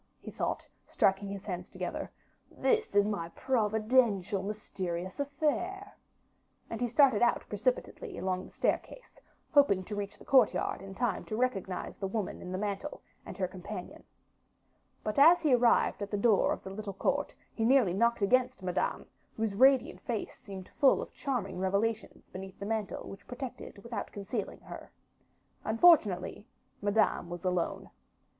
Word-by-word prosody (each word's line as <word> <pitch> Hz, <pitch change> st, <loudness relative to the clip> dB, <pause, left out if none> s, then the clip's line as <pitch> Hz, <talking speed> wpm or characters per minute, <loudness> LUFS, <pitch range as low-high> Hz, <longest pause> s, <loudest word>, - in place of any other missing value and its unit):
he -, -, -9 dB
thought, -, -, -2 dB, 0.2 s
striking 195 Hz, +1 st, +2 dB
his 200 Hz, -1 st, -6 dB
hands 180 Hz, -2 st, -5 dB
together, -, -, -4 dB, 0.4 s
"this 445 Hz, -, 0 dB
is 205 Hz, 0 st, +5 dB
my 170 Hz, -6 st, -2 dB
providential 220 Hz, -4 st, +2 dB
mysterious 190 Hz, -3 st, -5 dB
affair." 320 Hz, +8 st, -2 dB, 0.8 s
And -, -, -4 dB
he 245 Hz, -, +2 dB
started 250 Hz, -2 st, +4 dB
out 240 Hz, -, +2 dB
precipitately, -, -, -2 dB
along 185 Hz, -1 st, -1 dB
the -, -, -14 dB
staircase, -, -, -2 dB, 0.3 s
hoping 275 Hz, -11 st, +4 dB
to 205 Hz, +3 st, -6 dB
reach 205 Hz, 0 st, -5 dB
the -, -, -15 dB
courtyard 235 Hz, -9 st, +3 dB
in 195 Hz, 0 st, -9 dB
time 230 Hz, -4 st, -1 dB
to 215 Hz, -, -4 dB
recognize 195 Hz, -7 st, -2 dB
the 195 Hz, -, -3 dB
woman 205 Hz, 0 st, -3 dB
in 180 Hz, -, -7 dB
the 185 Hz, -, -2 dB
mantle, 200 Hz, -1 st, -4 dB, 0.2 s
and -, -, -8 dB
her 185 Hz, -2 st, 0 dB
companion. 185 Hz, +1 st, -8 dB, 1.0 s
But 215 Hz, +5 st, -1 dB
as 330 Hz, +5 st, +8 dB
he 300 Hz, -5 st, +3 dB
arrived 240 Hz, -4 st, +3 dB
at 205 Hz, -, -3 dB
the 205 Hz, -, -1 dB
door 205 Hz, -1 st, +4 dB
of -, -, -3 dB
the 190 Hz, -, -7 dB
little 200 Hz, 0 st, -5 dB
court, 195 Hz, -, -1 dB, 0.2 s
he 225 Hz, -, -2 dB
nearly 240 Hz, -6 st, +4 dB
knocked 235 Hz, +2 st, +2 dB
against 250 Hz, 0 st, +2 dB
Madame, 180 Hz, 0 st, -1 dB, 0.3 s
whose 220 Hz, -2 st, 0 dB
radiant 260 Hz, +4 st, +4 dB
face 230 Hz, -4 st, -4 dB
seemed 190 Hz, -2 st, -9 dB
full 275 Hz, -, +5 dB
of -, -, -12 dB
charming 220 Hz, -10 st, -3 dB
revelations 205 Hz, +4 st, -1 dB
beneath 190 Hz, +1 st, -8 dB
the 200 Hz, -, -5 dB
mantle 220 Hz, -1 st, -3 dB
which 195 Hz, -, -11 dB
protected 250 Hz, -3 st, -7 dB
without 235 Hz, -3 st, -5 dB
concealing 205 Hz, +1 st, -5 dB
her. -, -, -10 dB, 0.7 s
Unfortunately, 220 Hz, -, +4 dB, 0.3 s
Madame 205 Hz, -3 st, +1 dB
was 175 Hz, +1 st, -6 dB
alone. 180 Hz, -2 st, -1 dB
210 Hz, 155 wpm, -31 LUFS, 190-250 Hz, 1.0 s, as